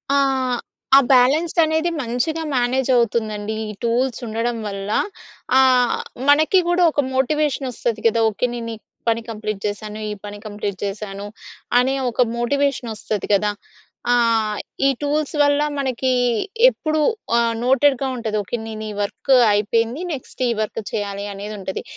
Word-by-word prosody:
ఆ! - - +4 0.8
ఆ - - +10
బ్యాలెన్స్ 285 +7 +4
అనేది 320 +2 +1
మంచిగా 260 +7 -2
మేనేజ్ 250 +2 +1
అవుతుందండి. 220 -2 0 0.2
ఈ - - -4
టూల్స్ 240 +1 0
ఉండడం 230 +2 -2
వల్ల. 195 0 -5 0.7
ఆహ్, 255 -2 +4 0.3
మనకి 315 +6 +5
గూడా 350 +1 +3
ఒక 290 - +1
మోటివేషన్ 280 0 +1
వస్తుది 230 -2 -3
కదా! 230 0 +3
ఓకే 220 +4 -1
నేను 230 -1 -5
ఈ - - -12 0.3
పని 230 0 +1
కంప్లీట్ 215 -2 -4
జేసాను. 210 +1 -4
ఈ - - -2
పని 205 0 -7
కంప్లీట్ 205 -2 -4
జేసాను. 200 0 -5 0.5
అనే 265 +2 +2 0.2
ఒక 245 - 0 0.2
మోటివేషన్ 265 -1 0
వస్తుంది 210 -1 -4
గదా! 205 +1 +2 0.6
ఆ! - - +5 0.7
ఈ - - +5
టూల్స్ 295 +1 -1
వల్ల 285 0 +3 0.2
మనకి 260 -1 0 0.6
ఎప్పుడు 310 -8 -1 0.4
ఆహ్, 230 -1 +1
నోటెడ్‌గా 270 0 +3
ఉంటది. 220 -3 -2
ఓకే 235 +4 -4
నేను 220 -1 -6
ఈ - - -6
వర్క్ 265 +6 0 0.2
అయిపోయింది. 230 - 0
నెక్స్ట్ 255 -1 -6
ఈ - - +2
వర్క్ 215 +1 -3
చేయాలి 200 -1 -3
అనేది 205 +2 -6
ఉంటది. 190 0 -5
235 Hz, 145 wpm, -21 LUFS, 215-270 Hz, 0.8 s, ఆ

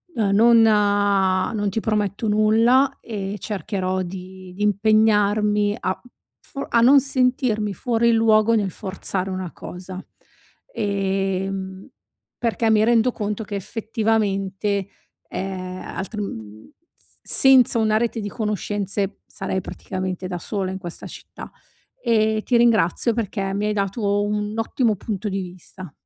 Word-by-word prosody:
uhm, 210 -4 +1
non 230 +3 +6
non 205 -1 +2
ti 200 - -2
prometto 210 -1 -1
nulla 225 +6 +3
e 200 -3 -5
cercherò 190 -3 -3
di 185 0 -9
di 205 - -3
impegnarmi 210 0 +2
a 185 - -3
u 245 - -18 0.3
for 275 - -7
a 235 - +3
non 270 +4 +7
sentirmi 250 -6 0
fuori 235 +3 +1
luogo 225 0 +4
nel 205 -4 0
forzare 190 0 -2
una 185 -2 -5
cosa, 185 +1 -9 0.7
ehm, 195 - -2 0.5
perché 230 -1 0
mi 215 -1 +4
rendo 235 +2 +3
conto 210 -1 -4
che 205 - -9
effettivamente, 200 -2 -1 0.4
ehm, 185 -1 -5 0.2
altrim 110 - -7 0.2
s - - -21
senza 260 -3 +7
una 215 -1 +2
rete 230 0 -1
di 205 -1 -4
conoscenze, 205 -2 -2
sarei 190 - -4
praticamente 185 0 -5
da 180 -1 -5
sola 190 +1 -3
in 190 - -5
questa 175 -3 -8
città. - - -11 0.5
Ehm, 220 - +1
ti 245 - 0
ringrazio 230 -1 +3
perché 200 -3 -3
mi 205 +1 -1
hai 210 - 0
dato 200 0 -1
un 210 0 -2
ottimo 225 0 0
punto 205 +1 -5
di 195 0 -2
vista. 185 -1 -10
205 Hz, 130 wpm, -22 LUFS, 190-220 Hz, 0.7 s, non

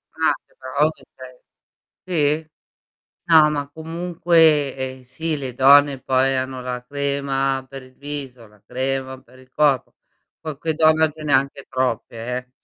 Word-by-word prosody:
Ah, - - +2
che - - -32
bravo 140 +4 +1
che - - -20 0.8
sei. 155 -3 -1
Sì? 155 - -35 0.7
No, 155 -2 +6
ma 145 -1 -3
comunque 160 -2 +2 0.2
eh, - - -18
sì, 160 +5 -3
le 130 -3 -5
donne 140 +1 +5
poi 135 +1 +1
hanno 130 0 -3
la 125 -1 -5
crema 140 -1 -1
per 135 -1 -9
il 130 0 -18
viso, 135 -5 -7
la 105 -1 -23
crema 130 0 -3
per 130 0 -21
il 130 0 -19
corpo. 145 -3 +1 0.5
Qualche 155 0 -3
donne 160 0 +4
ce 155 0 -12
ne 145 -2 -2
ha - - +8
anche 140 0 -6
troppe 125 -3 -2
eh 125 +2 -5
140 Hz, 155 wpm, -21 LUFS, 130-150 Hz, 0.8 s, ha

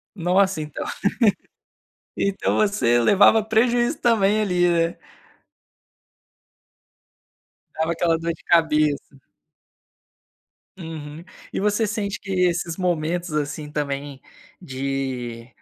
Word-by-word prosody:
Nossa! 190 0 +2
Então 150 -1 -5 1.3
então 200 -1 -1
você 200 - +2
levava 205 - +5
prejuízo 240 +5 +1
também 215 -3 +2
ali, 180 -3 +2
né. 170 -1 +1 2.8
Dava 160 +1 0
aquela 165 -1 +1
dor 165 +1 -2
de 165 - -16
cabeça. 150 -4 +1 1.6
Uhum. 160 -2 -8 0.3
E - - -2
você 210 +2 +1
sente 205 -1 -3
que 195 - -9
esses 175 -3 0
momentos, 175 -1 -1
assim, 150 0 -3
também, 140 -2 -4 0.4
de 130 -5 -4
170 Hz, 90 wpm, -22 LUFS, 150-200 Hz, 2.8 s, levava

